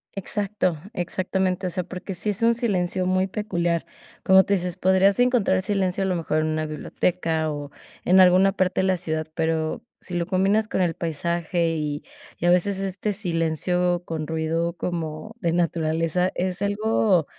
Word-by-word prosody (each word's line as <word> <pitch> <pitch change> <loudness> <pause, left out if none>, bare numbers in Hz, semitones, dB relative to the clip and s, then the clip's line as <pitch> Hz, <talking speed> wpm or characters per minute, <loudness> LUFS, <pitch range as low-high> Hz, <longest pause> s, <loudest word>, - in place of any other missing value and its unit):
Exacto. 195 -3 -1 0.2
Exactamente, 185 +1 -1
o - - -1
sea, 180 +1 -3
porque 185 +1 -7
sí 210 - -3
es 205 0 -3
un 230 0 +4
silencio 185 -5 0
muy 185 +1 +2
peculiar. 175 -5 -1 0.4
Como 190 0 +7
tú 200 - 0
dices, 180 -2 -1
podrías 190 +2 +3
encontrar 240 -7 +3
silencio 195 -1 0
a - - 0
lo 185 - 0
mejor 155 -2 0
en 155 - 0
una 155 0 -1
biblioteca 160 +1 -1
o, 145 -1 -6 0.3
en 185 +2 +5
alguna 185 +1 +6
parte 185 -1 +1
de 190 - +1
la 185 - +2
ciudad. 155 -3 -3
Pero, 160 -1 -1 0.2
sí 185 - -10
lo 175 0 -1
combinas 200 +3 +2
con 190 - -1
el 170 -2 +1
paisaje 170 +1 -1
y 150 -2 -3 0.3
y - - -3
a 175 - +5
veces 190 +2 +2
este 195 +2 -2
silencio 175 -1 0
con 155 -2 -4
ruido 160 +1 -1
como, 170 +5 -4
de 170 -5 0
naturaleza, 165 +1 0
es 185 +1 -2
algo 205 -4 +2
180 Hz, 175 wpm, -24 LUFS, 165-190 Hz, 0.4 s, Como